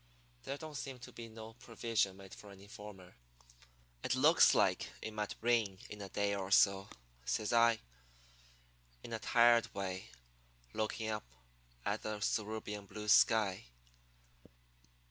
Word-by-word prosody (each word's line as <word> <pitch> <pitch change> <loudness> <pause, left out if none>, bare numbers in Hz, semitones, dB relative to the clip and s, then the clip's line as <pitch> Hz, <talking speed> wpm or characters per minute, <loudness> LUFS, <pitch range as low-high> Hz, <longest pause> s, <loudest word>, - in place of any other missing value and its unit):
There 140 - -3
don't 155 +1 -8
seem 135 -2 -5
to 125 - -11
be 115 -1 -9
no 110 0 -10
provision 115 -4 -1
made 95 -1 -12
for 105 - -12
an 100 -1 -13
informer.' 100 -3 -11 0.9
"'It - - 0
looks - - +6
like - - +2
it 110 - -6
might 105 -1 -3
rain 115 -5 +2
in 105 -1 -7
a 100 - -7
day 100 0 0
or 95 -1 -3
so,' 100 0 +4 0.4
says 105 - -1
I, 115 -1 +5 1.2
in 115 - -7
a 110 - -2
tired 120 0 +4
way, 95 -1 -4 0.6
looking 110 +1 -2
up 105 - -4 0.6
at - - -1
the 110 -1 -4
cerulean 105 -1 -2
blue 105 +2 -6
sky. 100 -2 +4
105 Hz, 140 wpm, -35 LUFS, 100-115 Hz, 1.2 s, looks